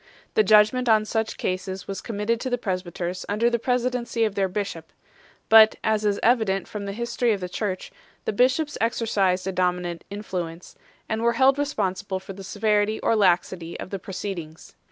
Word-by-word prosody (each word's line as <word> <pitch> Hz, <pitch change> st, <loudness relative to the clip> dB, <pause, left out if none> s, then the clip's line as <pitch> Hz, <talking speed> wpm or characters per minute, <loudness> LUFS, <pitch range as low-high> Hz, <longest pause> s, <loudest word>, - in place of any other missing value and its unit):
The -, -, +5 dB
judgement 215 Hz, +4 st, +4 dB
on 215 Hz, -1 st, +4 dB
such 220 Hz, 0 st, -2 dB
cases 185 Hz, 0 st, -3 dB
was 195 Hz, -, -5 dB
committed 225 Hz, +1 st, -1 dB
to 260 Hz, -, -2 dB
the 245 Hz, -, 0 dB
presbyters 185 Hz, -3 st, -3 dB
under 225 Hz, +4 st, +2 dB
the 235 Hz, -, +1 dB
presidency 250 Hz, -1 st, 0 dB
of 215 Hz, -, -2 dB
their 195 Hz, -1 st, +1 dB
bishop; 180 Hz, -4 st, -5 dB, 0.6 s
but, 220 Hz, 0 st, +8 dB
as 215 Hz, -1 st, +1 dB
is 205 Hz, -1 st, +1 dB
evident 220 Hz, -5 st, +2 dB
from 205 Hz, -1 st, -6 dB
the 200 Hz, -, -3 dB
history 235 Hz, +2 st, 0 dB
of 200 Hz, -, -3 dB
the 180 Hz, -, -4 dB
Church, 185 Hz, 0 st, -4 dB, 0.3 s
the -, -, -1 dB
bishops 260 Hz, +7 st, +1 dB
exercised 200 Hz, -5 st, +1 dB
a 190 Hz, -, -1 dB
dominant 180 Hz, -2 st, -1 dB
influence, 180 Hz, -4 st, -6 dB, 0.3 s
and 220 Hz, 0 st, -2 dB
were 235 Hz, 0 st, +3 dB
held 265 Hz, +3 st, +4 dB
responsible 195 Hz, -9 st, -2 dB
for 190 Hz, +1 st, -9 dB
the 195 Hz, +1 st, -10 dB
severity 210 Hz, +1 st, +1 dB
or 230 Hz, -, +2 dB
laxity 175 Hz, -3 st, +1 dB
of -, -, -7 dB
the 195 Hz, -, -3 dB
proceedings. 180 Hz, -4 st, -7 dB
205 Hz, 175 wpm, -24 LUFS, 185-230 Hz, 0.6 s, but